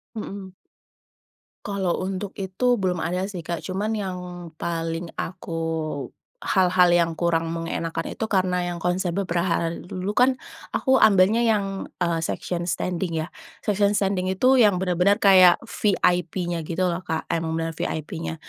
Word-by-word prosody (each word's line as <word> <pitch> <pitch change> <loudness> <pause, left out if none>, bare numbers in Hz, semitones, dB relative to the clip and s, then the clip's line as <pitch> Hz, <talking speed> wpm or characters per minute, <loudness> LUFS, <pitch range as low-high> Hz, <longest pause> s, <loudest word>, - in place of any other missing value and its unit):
Hmm. 195 -3 -7 1.1
Kalau 195 -3 -1
untuk 195 +1 -4
itu, 195 +6 0
belum 185 -5 -1
ada 180 +3 -1
sih, 195 -2 -5
Kak. 170 0 -5
Cuman, 205 +4 -2
yang 180 -4 -6
paling 165 0 -3
aku 165 -2 -5 0.8
hal-hal 180 -2 +4
yang 170 -1 +2
kurang 165 -1 0
mengenakkan 165 0 -3
itu 220 - -3
karena 185 -3 +1
yang 175 - -3
konser 180 -1 0
beberapa 180 -2 0
hari 165 0 -1
dulu 185 +3 -3
kan, 255 +4 +3 0.4
aku 265 -1 +3
ambilnya 200 +2 +5
yang 205 -4 0 0.2
eee, 170 -1 +1
section 175 +1 -3
standing 180 0 -2
ya. 160 +1 -3 0.3
Section 205 -1 +2
standing 190 -2 0
itu 250 +8 +3
yang 210 -4 +5
bener-bener 180 +2 +2
kayak 185 -3 +8
VIP-nya 180 -5 0
gitu 180 +2 -1
loh 175 -1 0
Kak, 160 -3 -4
emang 160 -1 -1
bener-bener 165 -1 -3
VIP-nya. 160 +1 -3
180 Hz, 145 wpm, -24 LUFS, 170-195 Hz, 1.1 s, kayak